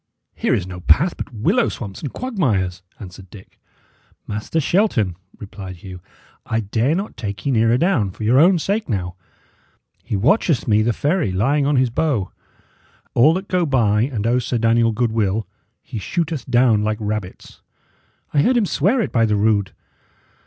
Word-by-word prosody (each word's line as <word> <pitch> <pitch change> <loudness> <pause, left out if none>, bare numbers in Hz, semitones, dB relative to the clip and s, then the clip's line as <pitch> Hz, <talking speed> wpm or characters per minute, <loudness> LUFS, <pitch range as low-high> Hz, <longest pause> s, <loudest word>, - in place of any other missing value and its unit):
"Here - - 0
is 90 - -2
no 90 -1 -8
path 165 - +3
but - - -7
willow 125 - +1
swamps 100 -5 -7
and 145 - -5
quagmires," 110 - -1 0.2
answered 95 -1 -11
Dick. 95 0 -15 0.7
"Master 105 +10 -3
Shelton," 140 - +1 0.2
replied 95 -2 -9
Hugh, 90 -2 -9 0.4
"I 110 - -1
dare 115 +8 0
not 195 +4 -4
take 100 +1 -6
ye 140 - +1
nearer 115 0 +3
down, 145 - +1
for 95 - -8
your 120 +5 +4
own 180 +4 +5
sake 200 +4 -2
now. 90 -5 -2 0.9
He - - -3
watcheth 145 - +2
me 105 -1 +3
the 115 +2 +2
ferry, 150 - 0
lying 140 +10 +1
on 145 - +2
his 130 -2 +2
bow. 120 - -1 0.8
All 150 +8 +5
that 190 +2 -4
go 180 -1 +1
by 115 -8 +2
and 115 -4 -2
owe 120 +2 +2
Sir 125 0 -2
Daniel 115 0 +3
goodwill, 110 -2 0 0.4
he 115 - -6
shooteth 160 - -3
down 120 -4 +3
like 110 0 -1
rabbits. 105 -3 -5 0.7
I 145 - +4
heard 250 - +3
him 225 - +2
swear 200 - +1
it - - -2
by 115 -2 +2
the 105 - +1
rood. 100 -2 +1
115 Hz, 170 wpm, -20 LUFS, 105-150 Hz, 0.9 s, own